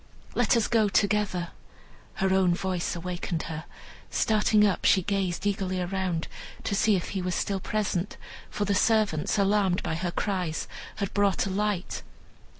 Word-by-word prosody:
let - - +3
us 230 - +2
go 220 -3 +3
together." 200 -4 +1 0.7
Her 190 0 +1
own 185 -2 +4
voice 185 -2 -2
awakened 175 -1 -3
her. 160 0 -6 0.4
Starting 215 -1 +3
up, 200 -3 +1
she 190 - +5
gazed 195 -1 -1
eagerly 195 -2 0
around, 180 -2 -1 0.4
to - - -2
see 210 +1 +3
if 180 - -2
he 195 - -2
was 180 0 -1
still 195 -1 -1
present, 200 -2 -2 0.3
for 205 - -2
the 200 - +1
servants, 210 -5 +2
alarmed 195 -2 +2
by - - -2
her 170 +2 -2
cries, 180 -4 -2 0.3
had 200 -2 -3
brought 200 -2 +2
a 195 - -3
light. 205 -1 -1
190 Hz, 155 wpm, -27 LUFS, 180-205 Hz, 0.7 s, she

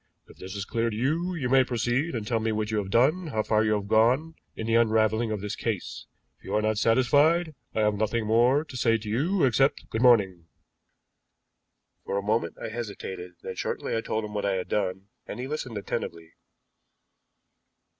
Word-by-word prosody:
If - - -17
this 95 +2 -8
is 100 -1 -4
clear 115 +1 -1
to 110 - -5
you, 160 +10 -1
you 140 -7 -2
may 130 +1 +5
proceed 125 +5 -1
and 110 -3 -3
tell 115 +1 0
me 110 0 -1
what 110 0 -2
you 110 - +1
have 95 -2 -4
done, 150 - +2
how 110 -7 -1
far 110 0 +2
you 110 -1 +2
have 100 -1 -2
gone 125 +10 +3 0.2
in 110 - -5
the 115 - 0
unraveling 110 0 +3
of 105 -2 -3
this 105 0 -4
case; - - -4 0.3
if - - -31
you - - -3
are 105 - +2
not 110 -1 +1
satisfied, 145 +9 +3 0.2
I 110 - +1
have 105 0 +3
nothing 110 +2 -1
more 120 +7 +3
to 135 - -11
say 115 -2 +2
to 110 -1 -10
you 155 - +1
except 135 +2 +2
'Good 110 - -1
morning!'" 95 -9 +4 1.6
For 100 - -2
a 100 - -2
moment 105 -5 -1
I - - -5
hesitated, 100 -6 -6
then - - -5
shortly - - -3
I 115 - 0
told 110 -1 -2
him 105 - -8
what 105 - -2
I 100 - +1
had 90 - -4
done, 95 -1 -2 0.2
and - - -6
he 125 - -3
listened 130 -5 -4
attentively. 85 -4 -5
110 Hz, 205 wpm, -27 LUFS, 105-130 Hz, 1.6 s, may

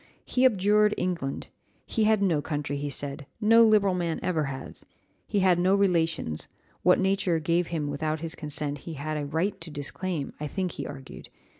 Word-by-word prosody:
He 255 +1 +2
abjured 210 -1 +4
England; 170 -7 -3 0.4
he 220 -2 0
had 215 -2 +3
no 165 -6 +2
country, 145 -2 -3
he 145 +1 -3
said, 140 +1 -4
no 225 +1 +6
liberal 210 -3 +4
man 170 -2 -1
ever 160 -5 0
has; 135 -1 -5 0.4
he 205 -2 +1
had 185 -2 +4
no 185 +2 +4
relations 165 - 0 0.3
what 180 - +5
nature 190 -3 +1
gave 170 +2 +1
him 155 -3 -2
without 155 +2 -2
his 165 0 -4
consent 150 -1 -2
he 165 - -7
had 155 +1 -4
a 145 -1 -3
right 180 +6 -1
to 165 - -7
disclaim, 150 +2 -3
I 150 - -3
think 185 +3 -2
he - - -6
argued. 135 -2 -10
165 Hz, 180 wpm, -27 LUFS, 145-195 Hz, 0.4 s, no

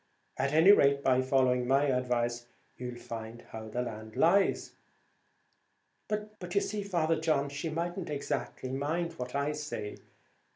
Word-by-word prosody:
At 140 +1 0
any 160 +6 +7
rate, 140 -7 +5
by 130 -1 +4
following 130 -1 +2
my 135 +2 +4
advice, 120 -2 0 0.3
you'll 125 -1 -6
find 115 0 -7
how 110 0 -7
the 120 +3 -2
land 110 -2 -7
lies." 195 +4 +3 1.4
"But 210 -4 -5
you 200 - +4
see, 210 0 -2
Father 165 -5 +1
John, 155 -3 +1
she 145 +4 -4
mightn't 170 +2 -3
exactly 140 -2 -3
mind 160 +6 -1
what 125 +1 -5
I 140 +1 +1
say. 150 -8 -5
140 Hz, 140 wpm, -31 LUFS, 125-165 Hz, 1.4 s, any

